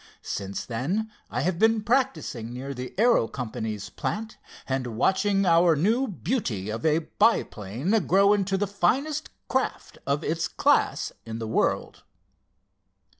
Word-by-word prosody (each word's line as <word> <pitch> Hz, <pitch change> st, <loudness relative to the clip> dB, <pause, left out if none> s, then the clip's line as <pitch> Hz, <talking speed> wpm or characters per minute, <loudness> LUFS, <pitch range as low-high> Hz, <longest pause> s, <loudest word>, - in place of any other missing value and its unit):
Since 100 Hz, 0 st, -4 dB
then 175 Hz, -, -2 dB, 0.2 s
I -, -, -2 dB
have 170 Hz, +3 st, -1 dB
been 225 Hz, -1 st, +3 dB
practicing 230 Hz, -, 0 dB
near 135 Hz, +3 st, -5 dB
the 125 Hz, -1 st, -7 dB
Aero 230 Hz, -, +4 dB
Company's 110 Hz, -5 st, -5 dB
plant, 220 Hz, +1 st, -4 dB, 0.3 s
and 125 Hz, -4 st, -2 dB
watching 195 Hz, -, +2 dB
our 170 Hz, -1 st, +5 dB
new 225 Hz, -, +2 dB
beauty 160 Hz, -, -2 dB
of 115 Hz, +1 st, -5 dB
a 155 Hz, +1 st, +2 dB
biplane 110 Hz, -, +1 dB, 0.2 s
grow 200 Hz, +3 st, +5 dB
into 195 Hz, -1 st, +1 dB
the 205 Hz, -, +1 dB
finest 275 Hz, -, 0 dB, 0.2 s
craft 260 Hz, 0 st, -2 dB
of 140 Hz, +3 st, 0 dB
its 165 Hz, +2 st, -1 dB
class -, -, +2 dB
in 115 Hz, 0 st, -6 dB
the 115 Hz, -1 st, -4 dB
world." 110 Hz, -, 0 dB
170 Hz, 135 wpm, -26 LUFS, -, 0.3 s, our